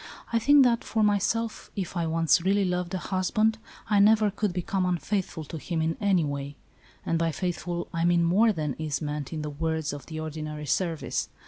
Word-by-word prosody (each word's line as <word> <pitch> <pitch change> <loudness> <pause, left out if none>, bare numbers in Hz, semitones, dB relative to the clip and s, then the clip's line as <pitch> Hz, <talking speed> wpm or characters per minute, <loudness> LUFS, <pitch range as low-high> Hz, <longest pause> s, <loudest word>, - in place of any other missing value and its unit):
I 230 - +4
think 285 +4 +6
that, 235 -2 +2
for 220 -1 0
myself, 215 +2 0
if 190 -1 -4
I 170 -2 0
once 165 +1 +3
really 195 +2 +2
loved 180 0 -2
a - - 0
husband, 215 +5 0 0.3
I 210 -2 +3
never 215 0 +5
could 210 0 -1
become 185 +2 -1
unfaithful 180 -1 -1
to 155 +2 -7
him 170 +2 -3
in 160 0 0
any 190 -5 +3
way; 140 0 -4 0.5
and, 165 - 0
by 165 -1 +1
faithful, 175 +1 -3
I 165 0 0
mean 175 0 +3
more 200 +7 +4
than 155 -7 -2
is 150 -3 -2
meant 150 -2 -4
in 155 -2 -4
the 150 - -4
words 160 +1 -2
of 145 - -8
the 160 -1 -6
ordinary 155 -1 -5
service. 150 -5 -1
175 Hz, 200 wpm, -27 LUFS, 155-200 Hz, 0.5 s, think